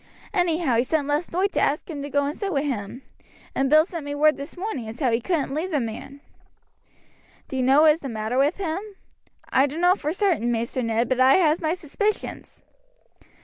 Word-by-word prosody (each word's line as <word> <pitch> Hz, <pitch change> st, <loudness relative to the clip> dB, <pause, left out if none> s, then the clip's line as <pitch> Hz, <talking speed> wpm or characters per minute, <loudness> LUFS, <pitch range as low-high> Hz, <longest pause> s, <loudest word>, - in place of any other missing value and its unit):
Anyhow 335 Hz, -, +1 dB
he 235 Hz, -, +3 dB
sent 290 Hz, +1 st, -1 dB
last 295 Hz, +4 st, -1 dB
noight 380 Hz, +4 st, +1 dB
to -, -, 0 dB
ask 295 Hz, -, 0 dB
him 300 Hz, -4 st, -6 dB
to 285 Hz, -, -5 dB
go 285 Hz, 0 st, +1 dB
and 290 Hz, +2 st, -3 dB
sit 400 Hz, -2 st, -3 dB
wi' 280 Hz, -4 st, 0 dB
him, 250 Hz, -2 st, -4 dB, 0.5 s
and 270 Hz, 0 st, 0 dB
Bill 310 Hz, +2 st, +6 dB
sent 340 Hz, -4 st, -6 dB
me 285 Hz, 0 st, -4 dB
word 305 Hz, +1 st, +4 dB
this 280 Hz, +5 st, -8 dB
morning 355 Hz, -, -4 dB
as 220 Hz, +2 st, -8 dB
how 260 Hz, -5 st, +1 dB
he 230 Hz, +1 st, +1 dB
couldn't 295 Hz, -1 st, -1 dB
leave 320 Hz, +6 st, -2 dB
the 305 Hz, -5 st, 0 dB
man." 250 Hz, +4 st, -6 dB, 1.3 s
"Do -, -, -6 dB
you 260 Hz, -, 0 dB
know 270 Hz, +4 st, +5 dB
what 315 Hz, -, +8 dB
is 310 Hz, -, -1 dB
the 275 Hz, -, -6 dB
matter 220 Hz, +2 st, -2 dB
with 290 Hz, +5 st, +2 dB
him?" 355 Hz, -3 st, -2 dB, 0.7 s
"I 270 Hz, +2 st, +4 dB
dunno 345 Hz, +6 st, +3 dB
for 305 Hz, -5 st, -3 dB
certain, 350 Hz, -, +1 dB
Maister 235 Hz, +2 st, -2 dB
Ned, 230 Hz, 0 st, 0 dB
but 260 Hz, -1 st, 0 dB
I 260 Hz, +1 st, +6 dB
has 320 Hz, -3 st, +3 dB
my 320 Hz, +1 st, 0 dB
suspicions." 410 Hz, +6 st, -4 dB
290 Hz, 215 wpm, -24 LUFS, 260-330 Hz, 1.3 s, what